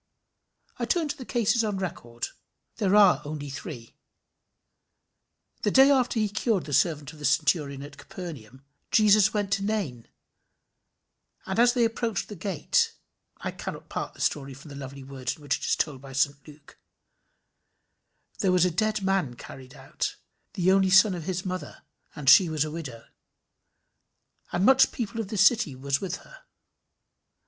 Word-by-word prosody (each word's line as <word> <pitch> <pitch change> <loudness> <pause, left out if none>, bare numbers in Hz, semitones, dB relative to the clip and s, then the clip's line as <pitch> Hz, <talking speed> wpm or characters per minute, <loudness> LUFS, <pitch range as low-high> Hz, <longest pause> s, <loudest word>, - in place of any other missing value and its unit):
I - - 0
turn 335 -4 0
to 290 - -2
the 255 - -9
cases 235 -1 +1
on 210 -3 -1
record. 120 -11 -5 0.5
They 205 - 0
are 200 -1 +5
only 145 -1 -6
three. 135 - -8 1.7
The - - +1
day 270 +6 +6
after 250 -4 +2
he 215 - +2
cured 210 -1 -1
the 145 - -6
servant 150 +1 +1
of 155 - -15
the - - -10
centurion 145 -3 +1
at 145 0 -11
Capernaum, 135 - -9 0.3
Jesus 210 -2 +5
went 205 -2 -1
to 195 - -1
Nain, 195 - -3 1.4
and 190 +3 -2
as 240 0 +5
they 245 -2 +3
approached 225 -4 -2
the 210 - -7
gate 180 -4 0 0.4
but - - -13
I - - -1
cannot - - -8
part - - -5
the - - -11
story 135 -2 -1
from 140 +4 -13
the 140 - -9
lovely 135 0 -8
words 130 -2 -5
in 150 - -18
which 145 -1 0
it - - -5
is - - +2
told 140 -4 -2
by 135 -1 -11
St 140 +1 0
Luke: 145 -1 -16 1.6
"There 190 -3 +2
was 180 -1 +4
a 180 - +1
dead 215 +3 0
man 190 -10 0
carried 130 +1 -12
out, - - -4 0.4
the 185 0 +2
only 190 0 +4
son 190 +1 +6
of 170 -3 -6
his 185 0 -3
mother, 185 0 -6 0.3
and 150 -3 -8
she 180 +5 +8
was 155 -1 0
a 155 - -6
widow; 135 -8 -7 1.5
and 175 +2 +1
much 265 +1 +6
people 230 -1 -4
of 215 - -6
the 210 - -5
city 195 - +4
was 140 +1 -1
with 185 -2 -3
her. - - -16
180 Hz, 170 wpm, -26 LUFS, 140-210 Hz, 1.7 s, she